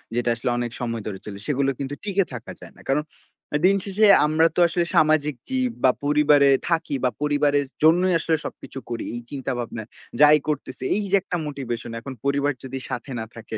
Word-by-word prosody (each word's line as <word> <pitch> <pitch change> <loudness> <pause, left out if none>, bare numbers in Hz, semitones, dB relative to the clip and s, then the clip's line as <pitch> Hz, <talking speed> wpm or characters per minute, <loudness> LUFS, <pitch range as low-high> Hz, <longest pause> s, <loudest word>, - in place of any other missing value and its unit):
যেটা 120 0 0
আসলে 115 +2 -2
অনেক 120 -1 -2
সময় 115 -2 -3
ধরে 95 -2 -5
চলে, 100 -2 -7
সেগুলো 140 -1 +1
কিন্তু 140 +1 -4
টিকে 200 -2 +1
থাকা 120 -2 -7
যায় - - -13
না। - - -15
কারণ, 150 +2 +2 0.5
এ - - +5
দিন 195 +1 +5
শেষে 205 +2 +2 0.2
আমরা 160 +2 +4
তো - - 0
আসলে 170 +1 0
সামাজিক 150 -2 +3
জীব 255 -2 0
বা 130 - +6
পরিবারে 145 -1 +5 0.2
থাকি। 165 -4 0
বা - - +4
পরিবারের 145 -1 +2 0.2
জন্যই 175 +4 +5
আসলে 165 0 +1
সবকিছু 135 - -7
করি, 115 -1 -3
এই 120 - -5
চিন্তাভাবনায় 120 -5 -4 0.3
যাই 150 +1 +8
করতেছি। 140 -4 -4
এই 210 - 0
যে - - +5
একটা 180 -2 -3
মোটিভেশন। 120 -5 -5
এখন 130 +4 -8
পরিবার 140 +1 +1
যদি 130 0 -5
সাথে 125 +2 -5
না 110 - -4
থাকে 110 -1 -7
145 Hz, 195 wpm, -23 LUFS, 125-160 Hz, 0.5 s, যাই